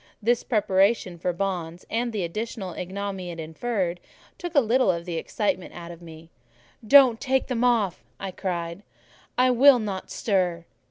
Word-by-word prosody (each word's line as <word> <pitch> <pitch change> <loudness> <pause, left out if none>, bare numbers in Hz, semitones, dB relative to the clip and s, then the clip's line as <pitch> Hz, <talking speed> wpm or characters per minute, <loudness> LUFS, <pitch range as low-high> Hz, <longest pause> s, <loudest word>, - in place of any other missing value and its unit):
This 235 +2 +1
preparation 195 -4 +1
for 180 - 0
bonds, 175 -2 -4
and 235 +1 -1
the 210 -4 -2
additional 195 +1 -4
ignominy 190 0 -5
it 170 -1 -7
inferred, 175 +2 -2 0.4
took 350 -1 -6
a - - +8
little 250 -1 +2
of 170 -2 0
the 170 -2 -3
excitement 185 +1 -2
out 170 0 -8
of 170 0 -12
me. 165 0 -12 0.5
"Don't 250 0 +6
take 265 -1 +1
them 245 -2 -1
off," 225 -7 +1 0.2
I 195 -1 -4
cried; 175 -1 -4 0.6
"I 255 0 +4
will 260 +2 +7
not 200 -5 -4
stir." 180 -5 0
195 Hz, 160 wpm, -25 LUFS, 175-235 Hz, 0.6 s, a